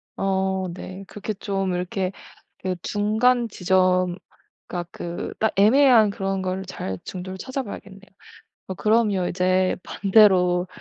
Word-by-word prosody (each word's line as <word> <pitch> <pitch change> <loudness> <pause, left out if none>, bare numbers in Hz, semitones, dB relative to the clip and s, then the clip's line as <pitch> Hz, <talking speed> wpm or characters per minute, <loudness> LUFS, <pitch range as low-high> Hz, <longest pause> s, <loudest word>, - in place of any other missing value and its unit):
어 190 -1 -1
네. 185 +2 -8
그렇게 210 +2 -5
좀 195 -2 -2
이렇게 185 +1 -2 0.5
그 185 -1 -2
중간 230 +4 +1
지점 185 -2 +2 0.5
그니까 175 -1 -4
그 175 +1 -6
딱 220 - +1
애매한 230 +2 +6
그런 195 -1 -2
걸 185 +1 -3
잘 95 - -5
중도를 185 0 -6
찾아봐야겠네요. 205 -4 -6 0.7
어 190 - -4
그러면 210 -3 +2
이제 185 +1 +1
반대로 190 -3 +4
190 Hz, 250 characters per minute, -23 LUFS, 185-210 Hz, 0.7 s, 애매한